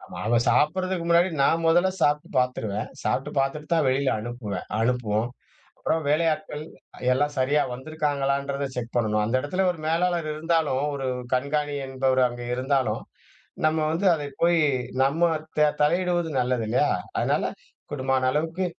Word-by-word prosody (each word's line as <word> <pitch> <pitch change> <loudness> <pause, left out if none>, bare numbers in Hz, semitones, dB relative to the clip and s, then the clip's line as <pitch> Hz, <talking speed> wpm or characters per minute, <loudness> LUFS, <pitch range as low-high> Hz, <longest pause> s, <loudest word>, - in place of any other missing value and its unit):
நாங்க 110 +6 +1
சாப்பிடுறதுக்கு 185 +3 +1
முன்னாடி 170 +2 +4
நான் 165 +4 +3
மொதல 175 +3 +4
சாப்பிட்டு 150 0 +2
பார்த்துருவேன், 115 -3 -1
சாப்பிட்டு 140 +3 -1
பார்த்துட்டு 135 +3 -1
தான் 160 -4 +2
வெளில 135 +1 +2
அனுப்புவேன் 120 -2 -5
அனுப்புவோம், 115 -2 0 0.5
அப்புறம் 160 - 0
வேலை 155 +3 +3
ஆட்கள் 155 0 -6 0.5
எல்லாம் 145 +3 +1
சரியா 140 +3 +2
வந்துருக்காங்களன்றத 140 -1 -1
செக் 120 -1 -5
பண்ணணும், 105 -2 +1
அந்த 115 +4 -2
இடத்துல 185 +7 -1
ஒரு 170 - -5
மேலாளர் 170 0 +1
இருந்தாலும், 155 -4 0
ஒரு 135 -1 -3 0.3
கண்காணி 145 +2 -1
என்பவர் 130 -1 +1
அங்கே 120 0 -7
இருந்தாலும், 130 +1 0 0.6
நம்ம 160 +1 +2
வந்து 185 +4 0
அதை 145 -2 -4 0.2
போய், 170 -1 +4 0.4
நம்ம 155 +5 0 0.4
த 150 - +6
தலையிடுவது 175 +2 +1
நல்லது 125 -2 0
இல்லையா? 120 - +2 0.3
அதனால - - 0 0.4
கூடுமான 130 -2 +1
அளவுக்கு 165 +5 -1
145 Hz, 135 wpm, -25 LUFS, 130-160 Hz, 0.6 s, த